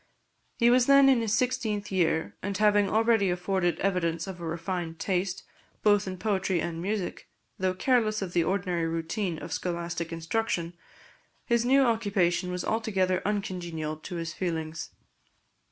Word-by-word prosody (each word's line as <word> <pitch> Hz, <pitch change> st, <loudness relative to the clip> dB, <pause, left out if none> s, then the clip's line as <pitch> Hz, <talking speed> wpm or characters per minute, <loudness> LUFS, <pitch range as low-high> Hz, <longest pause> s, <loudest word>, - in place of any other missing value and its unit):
He 235 Hz, 0 st, +5 dB
was 245 Hz, 0 st, +4 dB
then 275 Hz, 0 st, +7 dB
in 255 Hz, -3 st, +4 dB
his 225 Hz, -2 st, -1 dB
sixteenth 220 Hz, -5 st, -1 dB
year; 165 Hz, -3 st, +1 dB
and 200 Hz, 0 st, -3 dB
having 205 Hz, -1 st, +4 dB
already 225 Hz, -2 st, +3 dB
afforded 180 Hz, 0 st, 0 dB
evidence 170 Hz, -4 st, 0 dB
of 185 Hz, -2 st, -8 dB
a -, -, -5 dB
refined 170 Hz, 0 st, -3 dB
taste, 185 Hz, +1 st, -1 dB, 0.4 s
both 205 Hz, -1 st, +4 dB
in 185 Hz, 0 st, -4 dB
poetry 190 Hz, -2 st, 0 dB
and 165 Hz, 0 st, -3 dB
music, 200 Hz, 0 st, -3 dB, 0.3 s
though 185 Hz, 0 st, 0 dB
careless 220 Hz, -1 st, +2 dB
of 180 Hz, -2 st, -6 dB
the 170 Hz, -, +3 dB
ordinary 180 Hz, -2 st, 0 dB
routine 165 Hz, +2 st, -2 dB
of -, -, -6 dB
scholastic 170 Hz, -1 st, -3 dB
instruction, 170 Hz, 0 st, -2 dB, 0.7 s
his 235 Hz, 0 st, +2 dB
new 270 Hz, +2 st, +5 dB
occupation 200 Hz, -7 st, +1 dB
was 180 Hz, -1 st, -3 dB
altogether 195 Hz, -5 st, 0 dB
uncongenial 175 Hz, -6 st, -3 dB
to 155 Hz, +3 st, -8 dB
his 165 Hz, -1 st, -4 dB
feelings. 160 Hz, -2 st, -3 dB
185 Hz, 150 wpm, -28 LUFS, 170-210 Hz, 0.7 s, then